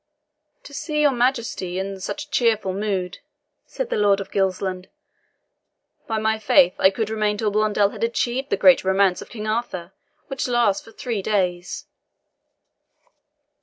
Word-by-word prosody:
"To 285 - -13
see 300 +1 -2
your 295 -1 +5
Majesty 235 -7 -1
in 195 0 -4
such 295 +10 -6
cheerful 220 -5 +1
mood," 190 -3 -2 0.5
said - - -5
the - - 0
Lord 205 -1 +3
of 195 - -7
Gilsland, 190 -1 -1 1.2
"by 220 - -1
my 220 0 0
faith, 180 -4 +4
I 190 - +6
could 215 +2 -3
remain 210 -1 0
till 210 -1 0
Blondel 210 -1 +2
had - - -6
achieved 240 +3 -1
the - - +1
great 275 -1 +6
romance 190 -1 +2
of - - -11
King 215 -2 -7
Arthur, 215 -5 -3 0.3
which 270 -2 -3
lasts 240 -5 +2
for 225 - -15
three 235 -5 -4
days." 180 -3 -1
210 Hz, 150 wpm, -22 LUFS, 190-235 Hz, 1.2 s, I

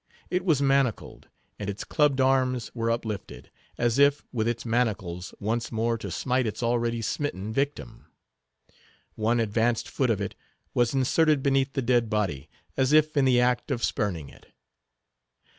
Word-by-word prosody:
It 180 0 0
was 155 -7 +2
manacled, 135 -4 0 0.3
and 100 -1 -4
its 100 0 -5
clubbed 145 -3 +2
arms 130 -2 +1
were 115 -1 -1
uplifted, 110 -3 -4 0.3
as 120 +2 +1
if, 140 +1 +4
with 115 -3 -1
its 120 0 -2
manacles, 100 -7 -1
once 115 +3 -2
more 115 +1 0
to - - -6
smite 130 -2 0
its 110 - -4
already 115 -1 0
smitten 110 -6 -3
victim. 135 - -3 1.1
One 115 +2 +1
advanced 115 +1 +1
foot 130 -3 0
of 110 -4 +1
it 100 -1 -3 0.4
was 120 +2 +1
inserted 145 +2 +2
beneath 135 -1 +1
the 135 - -1
dead 120 -2 +2
body, 95 - -2 0.3
as 135 +1 +2
if 155 0 +4
in 140 -2 +3
the 125 -2 +4
act 125 0 +1
of 120 - -2
spurning 85 -9 -1
it. - - -18
120 Hz, 160 wpm, -26 LUFS, 110-135 Hz, 1.1 s, if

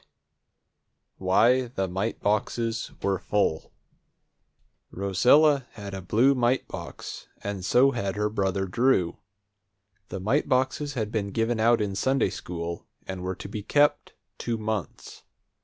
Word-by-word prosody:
_ - - -30 1.2
WHY 120 +7 +3
THE 95 -5 -2
MITE 95 +5 -3
BOXES 115 +2 -1
WERE 95 -2 +1
FULL 100 -6 0 1.2
Rosella 125 - +3
had 100 -3 -8
a 95 - -5
blue 115 +9 +3
mite 125 0 +1
box, - - -8 0.2
and 100 -2 -4
so 130 +8 +4
had 100 -6 -2
her 105 0 0
brother 95 -2 -1
Drew. 95 -3 +1 0.9
The 95 - -5
mite 115 +11 0
boxes 135 +2 0
had 110 -3 -2
been 105 -3 -1
given 115 +3 -1
out 115 +1 +4
in 105 -2 -1
Sunday 130 +6 +1
school, 85 -1 -6 0.2
and 95 -1 -5
were 95 +1 -3
to 95 - -8
be 105 +1 -5
kept 145 +6 +2 0.3
two 115 -1 -2
months. 110 -4 -5
105 Hz, 140 wpm, -26 LUFS, 95-125 Hz, 1.2 s, so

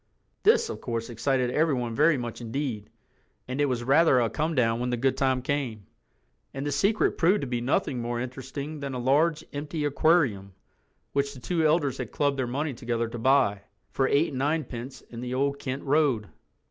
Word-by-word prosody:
This, 455 +2 +4
of - - -6
course, 115 -1 -3
excited 125 +2 0
everyone 130 -6 +1
very 150 +4 +4
much 120 -1 -5
indeed—and 115 +1 -6
it 145 - +3
was 125 -3 -1
rather 135 +1 +5
a 115 -2 +1
comedown 130 -8 +1
when 125 +1 -1
the 125 - 0
good 130 +2 +1
time 130 -2 +1
came, 130 -8 -2 0.7
and 135 +1 -3
the 145 - -1
secret 200 +10 +1
proved 185 +5 +4
to - - -2
be 120 -2 -2
nothing 125 0 0
more 120 0 -2
interesting 135 +4 -6
than 140 -2 -4
a - - -3
large 150 +5 +2
empty 150 +1 -3
aquarium 140 - +2 0.6
which 140 0 0
the - - -10
two 165 +6 -1
elders 150 -4 +1
had - - -5
clubbed 140 -2 0
their 130 - 0
money 140 +4 -2
together 115 -1 -2
to 120 - -6
buy, 115 -5 +3 0.3
for 135 - +1
eight 145 +5 +2
and 130 - -5
ninepence 135 -4 -2
in 120 0 -10
the 125 0 -3
Old 140 +1 0
Kent 130 0 -4
Road. 140 -7 +2
135 Hz, 185 wpm, -27 LUFS, 120-145 Hz, 0.7 s, rather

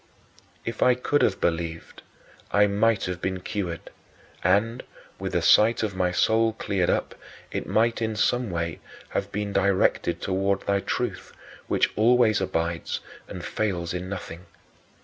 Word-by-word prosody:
If 115 -2 -5
I 125 -1 +5
could 145 +3 +1
have - - +2
believed, 85 -1 -2 0.5
I 105 - +5
might 105 +2 +2
have 90 -1 -4
been 95 0 -2
cured, 90 -5 -4 0.5
and, 105 +7 +2 0.4
with - - -4
the - - +1
sight 110 +1 +5
of 105 -3 -2
my 90 -1 +1
soul 110 +4 +2
cleared 100 -4 -1
up, - - 0 0.4
it - - -3
might 115 +1 +2
in 110 -1 -1
some 120 +2 +1
way 85 -2 -3 0.3
have - - -3
been 105 0 -3
directed 100 -1 +2
toward 95 +1 0
thy 100 0 +1
truth, - - -3 0.3
which - - +2
always 115 -1 +4
abides 85 -2 -2 0.3
and - - -7
fails 90 -6 -2
in 90 +1 -4
nothing. 90 -2 -7
100 Hz, 150 wpm, -25 LUFS, 90-110 Hz, 0.5 s, I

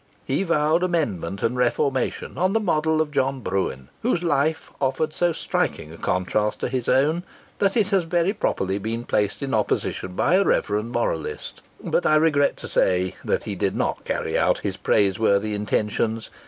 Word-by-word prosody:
He 135 +7 0
vowed 165 -2 +2
amendment 110 - -1
and 115 +2 +1
reformation 125 +1 0
on 185 +3 +1
the 225 - +3
model 160 -5 +1
of 155 -1 -2
John 135 -1 0
Bruen, 90 - -2
whose 200 -7 0
life 155 -1 0
offered 140 +4 0
so 175 -1 +1
striking 80 - -2
a - - -11
contrast 105 +5 0
to - - -1
his 125 -2 -2
own, 155 +6 +3 0.4
that 195 +3 +2
it 205 -3 +2
has 195 -4 +2
very 175 +3 +1
properly 95 - -1
been 115 +3 -3
placed 105 +3 -1
in 135 - -3
opposition 100 -3 -1
by 180 - +3
a 200 - +4
reverend 105 - 0
moralist; 100 -10 -3 0.2
but - - +1
I 155 - +4
regret 150 -2 +3
to - - -7
say 90 0 +1
that - - 0
he - - -4
did - - -1
not - - -1
carry - - -2
out - - +3
his - - -2
praiseworthy 100 +1 +2
intentions. 105 +2 -1
135 Hz, 175 wpm, -23 LUFS, 105-165 Hz, 0.4 s, a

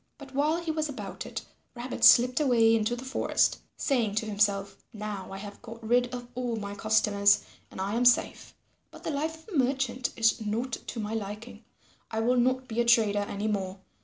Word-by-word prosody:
But 275 -2 -12
while 300 +4 +1
he 340 -2 -3
was 310 -1 -2
about 275 - -7
it, - - -6 0.3
Rabbit 245 +1 -6
slipped 250 +3 +7
away 235 -6 +4
into 225 +2 0
the 250 +2 -8
forest, 265 - +1 0.2
saying 235 -7 0
to 220 - 0
himself, 200 -1 0 0.2
"Now 210 -3 -6
I 195 - -6
have 205 +1 -9
got 230 -1 -10
rid 245 +1 +2
of 245 -1 -6
all 245 -1 -2
my 200 -2 -5
customers 205 -1 +3 0.3
and - - -11
I 195 +2 -2
am 240 +2 +1
safe. 245 - +2 0.3
But - - -14
the - - -2
life 320 +2 -4
of 420 - -10
a - - 0
merchant 260 -1 0
is 225 0 +2
not 225 +5 -2
to 235 - -6
my 215 0 -3
liking. 215 +2 -6 0.5
I 220 - -3
will 245 +2 +2
not 255 +1 +1
be 235 0 0
a - - 0
trader 220 -3 +4
any 205 +2 -3
more. 195 -2 -2
230 Hz, 200 wpm, -28 LUFS, 210-255 Hz, 0.5 s, slipped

